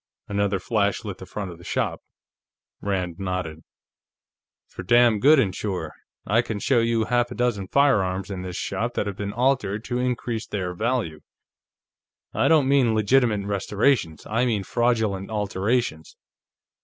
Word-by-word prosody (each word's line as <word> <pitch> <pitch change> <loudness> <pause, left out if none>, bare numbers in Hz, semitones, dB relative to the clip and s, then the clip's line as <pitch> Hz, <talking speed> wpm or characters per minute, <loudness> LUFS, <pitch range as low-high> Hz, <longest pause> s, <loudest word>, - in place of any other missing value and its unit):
Another 100 -1 0
flash 100 +2 0
lit 100 -3 -6
the 95 - -10
front 100 -3 -5
of 85 - -12
the - - -14
shop. - - -2 0.8
Rand 90 -3 -2
nodded. 90 -4 -3 1.0
"For - - -9
damn 120 +3 +4
good 145 +6 +6
and 100 -8 +1
sure. 90 -6 -4 0.3
I 110 +4 +3
can 115 -3 -4
show 120 +4 +2
you 115 -1 +1
half 120 +1 +1
a - - -7
dozen 120 -6 -1
firearms 100 -9 +2
in 95 -2 -4
this 90 -1 -6
shop - - -3
that - - 0
have 100 -2 -4
been 100 +1 -4
altered 115 -3 0
to 125 0 -2
increase 120 -2 -2
their 90 -3 -3
value. 110 -6 -1 1.1
I - - +2
don't 155 -4 +4
mean 130 -5 +3
legitimate 110 -1 +2
restorations; 100 - 0
I 115 +3 0
mean 105 -5 0
fraudulent 110 -4 0
alterations." 105 -4 -1
105 Hz, 155 wpm, -24 LUFS, 95-120 Hz, 1.1 s, good